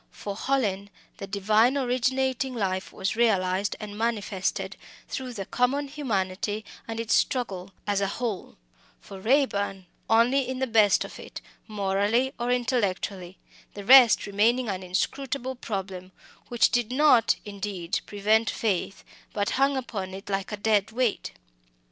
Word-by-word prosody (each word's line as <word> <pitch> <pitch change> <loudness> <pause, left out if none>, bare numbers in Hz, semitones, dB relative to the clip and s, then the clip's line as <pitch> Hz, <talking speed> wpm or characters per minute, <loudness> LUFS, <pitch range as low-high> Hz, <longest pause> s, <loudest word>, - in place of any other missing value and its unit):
For 200 -1 -7
Hallin, 205 -6 -1 0.3
the 195 - -7
divine 215 +6 +2
originating 260 0 0
life 190 -4 -2
was 190 - -2
realised 195 -4 +1
and 210 -1 -7
manifested 210 -4 -2 0.3
through 255 -2 -5
the 200 -4 -5
common 275 +6 0
humanity 210 -6 -2 0.2
and 225 0 -5
its 230 -1 0
struggle, 195 -7 0
as 200 -1 0
a 195 - +1
whole; 220 -2 -4 0.4
for 195 - -11
Raeburn, 205 -6 +1 0.2
only 245 +4 +3
in 260 - -3
the 265 - 0
best 215 -4 +4
of - - -11
it, - - -9 0.3
morally 210 +5 0
or 240 +1 -1
intellectually; 200 -7 -1 0.4
the 200 -1 -8
rest 250 -2 +8
remaining 225 +4 +1
an 190 -2 -3
inscrutable 260 +8 -2
problem, 190 -6 -6 0.3
which 240 -1 +3
did 240 -2 0
not, 255 -4 +4
indeed, 200 -4 -3
prevent 215 +2 +2
faith, 195 -3 -2 0.3
but 205 -1 -1
hung 275 +1 +2
upon 195 -7 -5
it 195 +1 -8
like 195 +1 -2
a 210 - -3
dead 205 -1 +2
weight. 240 -2 -1
215 Hz, 140 wpm, -26 LUFS, 195-250 Hz, 0.4 s, rest